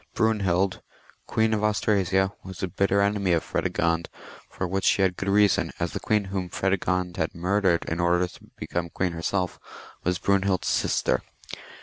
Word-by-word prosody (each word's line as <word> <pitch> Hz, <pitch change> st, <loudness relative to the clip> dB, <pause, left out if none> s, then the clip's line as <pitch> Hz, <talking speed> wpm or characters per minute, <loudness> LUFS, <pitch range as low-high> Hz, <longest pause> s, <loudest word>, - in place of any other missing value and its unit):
Brunehild, 95 Hz, -4 st, +1 dB, 0.5 s
Queen 110 Hz, 0 st, +1 dB
of 105 Hz, -, 0 dB
Anstrasia, 100 Hz, -2 st, +2 dB
was 95 Hz, 0 st, -8 dB
a -, -, +1 dB
bitter 100 Hz, +3 st, +1 dB
enemy 100 Hz, -2 st, +1 dB
of 85 Hz, -, +1 dB
Predegond, 85 Hz, 0 st, 0 dB, 0.4 s
for 95 Hz, -, -3 dB
which 95 Hz, +2 st, -1 dB
she 100 Hz, -, +4 dB
had 95 Hz, -1 st, +2 dB
good 100 Hz, -, -3 dB
reason, 100 Hz, 0 st, +3 dB
as -, -, -2 dB
the -, -, -3 dB
queen 105 Hz, -1 st, +1 dB
whom 90 Hz, -2 st, -2 dB
Fredegond 90 Hz, -1 st, -1 dB
had 80 Hz, -2 st, -2 dB
murdered, 90 Hz, 0 st, +1 dB
in 80 Hz, -, -3 dB
order 90 Hz, +1 st, +3 dB
to -, -, -16 dB
become 85 Hz, -1 st, -3 dB
queen 90 Hz, +2 st, -1 dB
herself, 90 Hz, +2 st, -2 dB, 0.4 s
was 90 Hz, 0 st, +1 dB
Brune 100 Hz, -1 st, +2 dB
hild's 95 Hz, -2 st, 0 dB
sister. -, -, +1 dB
95 Hz, 165 wpm, -26 LUFS, 90-100 Hz, 0.5 s, she